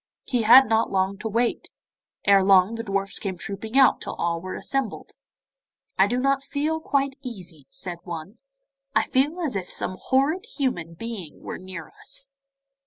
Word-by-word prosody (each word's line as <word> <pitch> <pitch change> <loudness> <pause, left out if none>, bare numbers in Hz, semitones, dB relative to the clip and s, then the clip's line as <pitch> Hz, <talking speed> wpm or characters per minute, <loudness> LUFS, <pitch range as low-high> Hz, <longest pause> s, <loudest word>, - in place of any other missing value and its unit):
He 245 -3 0
had 245 +5 +9
not 225 +1 +2
long 190 0 0
to 225 - -3
wait. 235 +2 0 0.6
Ere 200 -1 +6
long 190 +2 +5
the 230 - -3
dwarfs 195 -2 -1
came 190 -3 -4
trooping 200 +7 -4
out 265 -2 +6
till - - -5
all 170 -1 -1
were 185 +1 -5
assembled. 270 -1 -2 0.9
'I - - +6
don't 270 +2 +1
feel 300 +3 -1
quite 275 -2 0
easy,' 180 - -9
said 175 -2 -4
one; 175 +5 -7 0.6
'I - - +5
feel 290 +7 +1
as 295 -9 -2
if 185 -2 -3
some 185 - -1
horrid 305 - +1
human 175 - -1
being 205 -6 -7
were - - -6
near 185 -1 -8
us. 275 0 -4
220 Hz, 165 wpm, -25 LUFS, 185-270 Hz, 0.9 s, had